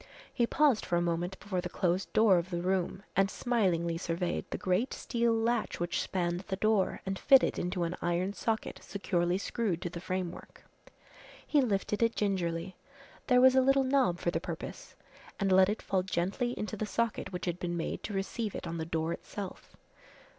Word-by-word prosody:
He 235 -3 +2
paused 285 -5 +3
for 175 - -1
a - - +3
moment 175 +2 -2
before 190 -3 -2
the 180 - -5
closed 180 +1 0
door 210 -5 +5
of 170 +2 -5
the 175 -1 -3
room 190 +1 -1
and 195 0 +3
smilingly 180 -9 0
surveyed 170 0 -2
the - - -3
great 185 +8 0
steel 235 -1 0
latch 225 0 0
which 175 0 -1
spanned 175 -2 -1
the 190 - -1
door 215 -1 +1
and 195 0 -3
fitted 270 -2 +5
into 180 0 -1
an 170 +1 -2
iron 175 +3 0
socket 220 +1 -2
securely 175 -2 0
screwed 200 -3 -1
to 175 - -3
the 170 - -6
framework. 185 -1 -5 0.8
He 295 - +3
lifted 210 -3 0
it 230 0 +3
gingerly 180 -3 -1 0.5
there 250 -1 +5
was 260 0 +7
a 260 - +5
little 270 +1 +4
knob 260 -9 +2
for 175 - -1
the - - -1
purpose - - -7 0.4
and 195 -1 +1
let 190 +1 +6
it 210 - -3
fall 190 -2 +1
gently 190 +7 -1
into 210 -1 -3
the 215 +1 -3
socket 230 -1 -1
which 180 -1 -4
had 175 -1 -2
been 175 -1 -2
made 165 - -3
to 210 - -5
receive 205 +2 -3
it - - -5
on 165 0 -4
the 160 - -2
door 165 0 -1
itself. 200 0 -8
190 Hz, 190 wpm, -31 LUFS, 175-220 Hz, 0.8 s, was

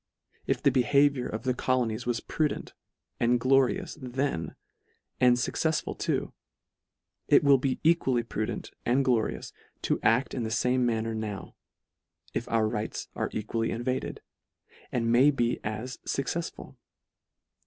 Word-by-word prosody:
If - - 0
the 140 - +5
behaviour 140 +1 +3
of 110 - -5
the 130 -1 +1
colonies 120 -2 0
was 120 -2 0
prudent 155 -2 -2 0.5
and 120 +1 +3
glorious 135 +4 +2
then, 130 - -2 0.6
and 125 -1 +6
fuccefsful 155 +5 -1
too; - - -1 0.9
it - - +5
will 140 -2 +6
be 130 0 -1
equally 135 -7 +3
prudent 110 -2 -4
and 130 +3 +2
glorious 120 -4 0 0.3
to - - +1
aci 120 +5 +2
in 130 - -2
the 110 - -2
fame 125 +3 +2
manner 115 -1 -1
now, 110 -3 -5 0.8
if - - -3
our 110 -1 +2
rights 110 0 -4
are - - -2
equal 110 +2 -3
ly 115 - +1
invaded, 125 +3 -3 0.7
and 115 -1 0
may 130 +5 +6
be 120 -4 0
as 110 +5 -4
fuccefsful. 165 +5 -4
125 Hz, 135 wpm, -28 LUFS, 115-135 Hz, 0.9 s, and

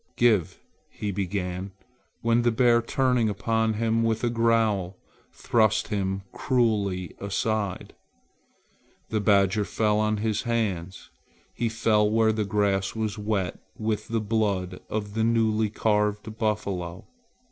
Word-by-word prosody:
"Give 100 -7 +2 0.2
" - - -41
he 105 - -4
began, 95 -1 -3 0.5
when 115 +1 +3
the 120 - +3
bear 120 0 +4
turning 125 -2 +1
upon 110 +2 0
him 115 +1 +1
with 115 0 0
a 120 - +1
growl, 110 -5 +1 0.3
thrust 110 -2 +1
him 95 -2 -2
cruelly 105 - 0
aside. 100 0 -2 1.2
The 110 - 0
badger 100 0 +3
fell 105 0 +1
on 110 0 +1
his 110 0 -1
hands. 100 -7 -3 0.4
He 115 -1 -1
fell 110 -2 +2
where 110 0 +3
the 110 -1 -1
grass 100 -1 0
was 110 -1 -2
wet 100 -4 -2 0.2
with 110 -1 -2
the 115 0 -1
blood 100 -4 -1
of 105 -1 -3
the 110 +1 0
newly 110 -1 +2
carved 105 0 0
buffalo. 100 -6 -2
105 Hz, 130 wpm, -26 LUFS, 100-115 Hz, 1.2 s, bear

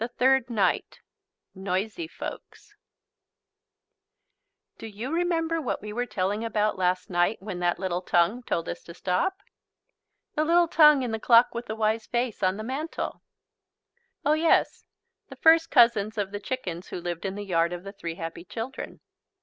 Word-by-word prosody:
THIRD 260 -1 +3
NIGHT 220 -4 0 0.5
NOISY 200 - -3
FOLKS - - -9 2.1
Do 225 - -7
you 220 +6 -6
remember 330 -1 0
what 255 - -2
we 210 +1 -7
were 245 +2 -2
telling 200 +3 -1
about 215 -2 0
last 185 0 -1
night 175 +5 +1
when 190 -2 -6
that 175 -1 +1
little 180 -1 -2
tongue 180 +7 +2
told 170 -8 -2
us - - -5
to 170 - -11
stop? 270 - 0 1.0
The 305 - +1
little 340 +2 +4
tongue 300 -4 +6
in 245 - -2
the 225 - -2
Clock 235 +1 +5
with 235 +1 -5
the 220 - -4
Wise 220 0 0
Face 240 -2 -2
on 185 +1 +1
the 215 - -5
mantel? 275 +7 -4 1.0
Oh 295 - +4
yes, 320 +1 +2 0.4
the - - -9
first 325 0 +5
cousins 225 -4 +4
of 200 -2 -2
the 205 - -4
chickens 190 -7 -5
who - - -6
lived 175 -1 -5
in 195 -1 -3
the 205 0 -6
yard 170 -2 +1
of 175 0 -6
the 195 0 -8
three 170 -5 -6
happy 165 0 -6
children. 225 +7 -7
215 Hz, 165 wpm, -26 LUFS, 185-260 Hz, 2.1 s, tongue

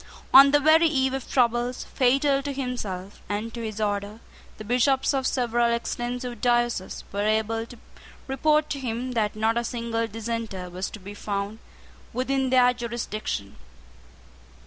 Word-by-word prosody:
On 275 +1 +10
the 290 +1 +4
very 315 +3 +5
eve 265 -4 +1
of 270 -2 -5
troubles, 240 0 +1
fatal 275 +2 +2
to 285 +1 -4
himself 215 -8 -5
and 210 +3 -3
to 235 - -5
his 215 -1 -5
order, 205 0 -2 0.4
the 215 - -8
Bishops 255 +5 +2
of 265 -1 0
several 240 -2 +1
extensive 240 0 -3
dioceses 240 -5 0
were 200 - -2
able 220 +2 0
to 240 - -12 0.5
report 300 +3 +2
to 280 - -2
him 250 0 -3
that 215 -4 0
not 220 +2 +1
a - - -2
single 230 -1 -2
dissenter 225 -4 -5
was 185 +2 -4
to 215 - -9
be 200 +2 -9
found 205 +1 -4 0.5
within 265 +1 0
their 250 -1 +5
jurisdiction. 230 - -4
235 Hz, 150 wpm, -25 LUFS, 215-260 Hz, 0.5 s, On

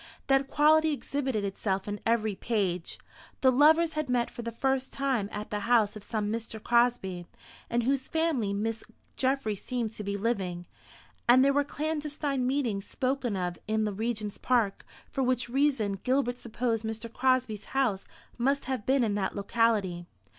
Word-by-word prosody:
That 270 0 +3
quality 310 +2 +4
exhibited 265 -6 -2
itself 195 0 -2
in 205 0 -3
every 220 -2 +2
page. 190 -5 -2 0.4
The 260 - +6
lovers 315 +5 +5
had 305 -3 -2
met 245 -1 +1
for - - -7
the 230 0 -4
first 265 +3 -1
time 260 -7 0
at 210 0 -6
the 210 - -1
house 220 -1 +3
of 215 - -8
some 210 -2 -2
Mr. 225 0 -4
Crosby, 235 -7 +1 0.4
in 240 +1 +1
whose 265 +2 0
family 320 -11 0
Miss 220 +2 -2 0.3
Geoffry 260 -5 0
seemed 235 +1 -3
to 210 - -7
be 200 0 -2
living; 190 -5 -2 0.6
and 255 +2 +7
there 280 - +4
were 285 +1 +3
clandestine 295 -3 -2
meetings 245 -8 -1
spoken 260 -4 -1
of 180 -1 -3
in 220 0 +1
the 210 - -2
Regent's 215 -1 -3
Park, 230 -6 +1 0.2
for 270 - -1
which 250 -1 +1
reason 250 -7 +1
Gilbert 250 -1 +1
supposed 230 -1 -2
Mr. 225 +1 -5
Crosby's 255 -5 +1
house 245 -8 0 0.3
must 275 +3 +1
have 260 -5 -3
been 265 -1 +3
in 215 -3 +1
that 195 -2 -1
locality. 200 -4 +1
235 Hz, 165 wpm, -29 LUFS, 210-270 Hz, 0.6 s, and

